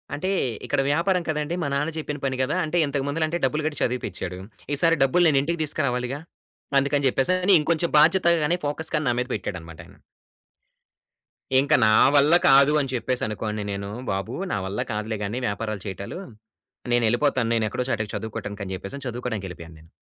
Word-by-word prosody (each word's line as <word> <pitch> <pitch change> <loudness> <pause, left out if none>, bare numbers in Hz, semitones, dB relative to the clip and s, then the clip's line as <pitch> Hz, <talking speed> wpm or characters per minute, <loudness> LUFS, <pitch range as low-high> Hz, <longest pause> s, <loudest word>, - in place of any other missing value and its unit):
అంటే 185 +6 -3 0.4
ఇక్కడ - - +1
వ్యాపారం 175 +4 +1
కదండీ! 150 +2 -1
మా 145 - -1
నాన్న 145 +3 -1
చెప్పిన 150 -1 -4
పని 130 -1 -1
కదా! 150 +7 -1
అంటే 155 +3 -1
ఇంతకుముందల 140 +3 -1 0.2
డబ్బులు 150 +3 -1
కట్టి 145 - -4
చదివిపించాడు. 95 -7 -3 0.4
ఈసారి 165 +3 +4
డబ్బులు 175 +7 +3
నేనింటికి 155 +3 +1
తీసుకురావాలిగా. 135 -3 -2 0.6
అందుకని 140 0 +1
చెప్పేసి 135 +8 +1 0.3
ఇంకొంచెం 165 +2 0
బాధ్యతగానే 170 0 +4
ఫోకస్ 160 +3 -2
గాని 150 -1 0
నా - - +2
మీద 125 - -2
పెట్టాడన్నమాట 85 -5 -7
ఆయన. - - -18 1.6
ఇంకా 145 +3 +3
నా 110 - +5 0.2
వల్ల 145 +3 +5
కాదు 140 +2 +6
అని 135 - -4
చెప్పేసనుకోని 110 -3 -2
నేను. 100 0 -4 0.2
బాబు, 95 +5 -3 0.2
నా - - 0
వల్ల 95 +2 -4
కాదులే 110 +1 -3
గానీ 105 +5 -3
వ్యాపారాలు 105 -1 -3
చేయటాలు. 100 - -6 0.7
నేనెళ్ళిపోతాను, 120 +1 +2
నేనెక్కడో 110 +2 -1 0.3
చదువుకోడానికి 105 -2 -5
అని 95 - -5
చెప్పేసని, 130 +9 -7
చదువుకోడానికెళ్ళిపోయాను 100 -9 -6
నేను. 80 +1 -19
135 Hz, 145 wpm, -24 LUFS, 110-150 Hz, 1.6 s, కాదు